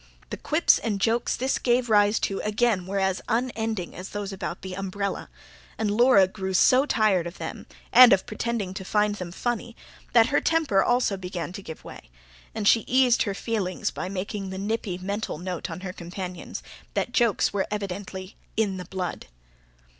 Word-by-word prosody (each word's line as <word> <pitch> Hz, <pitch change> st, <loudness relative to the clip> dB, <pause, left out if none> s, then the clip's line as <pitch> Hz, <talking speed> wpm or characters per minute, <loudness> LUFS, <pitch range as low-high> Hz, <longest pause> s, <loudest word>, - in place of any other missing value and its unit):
The -, -, -3 dB
quips -, -, +3 dB
and 210 Hz, -3 st, -2 dB
jokes 230 Hz, +3 st, +1 dB
this 260 Hz, +2 st, 0 dB
gave 245 Hz, 0 st, +2 dB
rise 210 Hz, -1 st, +4 dB
to 195 Hz, -, -1 dB
again 210 Hz, -3 st, +1 dB
were 200 Hz, +1 st, -2 dB
as 190 Hz, -1 st, 0 dB
unending 225 Hz, -5 st, -2 dB
as 185 Hz, +2 st, -7 dB
those 205 Hz, -1 st, -5 dB
about 185 Hz, -2 st, -5 dB
the 190 Hz, -1 st, -5 dB
umbrella; 195 Hz, +1 st, -3 dB, 0.5 s
and 215 Hz, -2 st, 0 dB
Laura 225 Hz, -3 st, +5 dB
grew 190 Hz, -1 st, -4 dB
so 255 Hz, +9 st, +5 dB
tired 200 Hz, -, +2 dB
of 170 Hz, -, -9 dB
them, -, -, -7 dB, 0.3 s
and 250 Hz, -1 st, +10 dB
of 195 Hz, -1 st, +4 dB
pretending 215 Hz, -3 st, -3 dB
to 190 Hz, -, -6 dB
find 210 Hz, +2 st, +1 dB
them 180 Hz, -4 st, -6 dB
funny, 235 Hz, +3 st, -3 dB, 0.4 s
that 230 Hz, -1 st, +6 dB
her -, -, +4 dB
temper 310 Hz, -13 st, +2 dB
also 245 Hz, -5 st, +2 dB
began 180 Hz, -2 st, -5 dB
to 200 Hz, -, -7 dB
give 160 Hz, -4 st, -9 dB
way; -, -, -11 dB, 0.5 s
and 210 Hz, -2 st, -1 dB
she 230 Hz, -, +6 dB
eased 255 Hz, -1 st, +4 dB
her 200 Hz, -3 st, 0 dB
feelings 200 Hz, -5 st, -2 dB
by 180 Hz, -, -5 dB
making 195 Hz, +1 st, -4 dB
the 190 Hz, -, -5 dB
nippy 200 Hz, -2 st, -2 dB
mental 200 Hz, 0 st, -3 dB
note 180 Hz, +1 st, -4 dB
on 165 Hz, +2 st, -6 dB
her 185 Hz, -1 st, -5 dB
companions, 180 Hz, 0 st, -7 dB, 0.3 s
that -, -, -1 dB
jokes 235 Hz, -5 st, +2 dB
were 200 Hz, -1 st, 0 dB
evidently 195 Hz, -2 st, -5 dB, 0.2 s
"in 205 Hz, -4 st, +1 dB
the 180 Hz, -, -6 dB
blood". 185 Hz, -2 st, -5 dB
200 Hz, 180 wpm, -26 LUFS, 185-225 Hz, 0.5 s, and